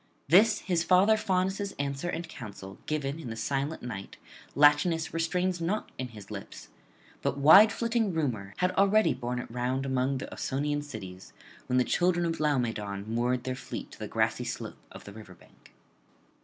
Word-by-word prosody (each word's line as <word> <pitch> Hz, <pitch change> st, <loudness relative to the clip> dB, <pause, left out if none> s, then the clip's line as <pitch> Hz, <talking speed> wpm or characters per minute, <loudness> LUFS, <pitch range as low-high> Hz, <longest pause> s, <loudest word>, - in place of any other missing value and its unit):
This 205 Hz, +8 st, +5 dB
his 175 Hz, -3 st, 0 dB
father 190 Hz, +5 st, +5 dB
Faunus' 195 Hz, -1 st, -1 dB
answer 140 Hz, +4 st, -3 dB
and 170 Hz, -1 st, -4 dB
counsel 100 Hz, -9 st, -10 dB
given 150 Hz, 0 st, -2 dB
in 150 Hz, -, -7 dB
the 110 Hz, -, -5 dB
silent 140 Hz, +6 st, -2 dB
night 110 Hz, -6 st, -7 dB, 0.4 s
Latinus 150 Hz, +3 st, +4 dB
restrains 180 Hz, +2 st, 0 dB
not 190 Hz, +6 st, -2 dB
in 130 Hz, -, -2 dB
his 105 Hz, -3 st, -12 dB
lips; 100 Hz, -11 st, -9 dB, 0.5 s
but -, -, -1 dB
wide 175 Hz, +10 st, +8 dB
flitting 230 Hz, -3 st, 0 dB
Rumour 120 Hz, -, -2 dB
had 180 Hz, 0 st, +1 dB
already 200 Hz, +3 st, +3 dB
borne 125 Hz, -1 st, -4 dB
it 120 Hz, -, -6 dB
round 125 Hz, +2 st, -1 dB
among 130 Hz, 0 st, 0 dB
the -, -, -5 dB
Ausonian 145 Hz, +2 st, -2 dB
cities, 95 Hz, -10 st, -9 dB, 0.3 s
when 125 Hz, -, +1 dB
the 125 Hz, -, +5 dB
children 175 Hz, +4 st, +1 dB
of 165 Hz, -1 st, -2 dB
Laomedon 115 Hz, -9 st, -1 dB
moored 120 Hz, +1 st, 0 dB
their 130 Hz, -, -2 dB
fleet 130 Hz, -, -7 dB
to -, -, -13 dB
the -, -, -5 dB
grassy -, -, 0 dB
slope -, -, -6 dB
of -, -, -11 dB
the 100 Hz, -, -11 dB
river 105 Hz, -4 st, -12 dB
bank. -, -, -22 dB
140 Hz, 170 wpm, -29 LUFS, 120-175 Hz, 0.5 s, wide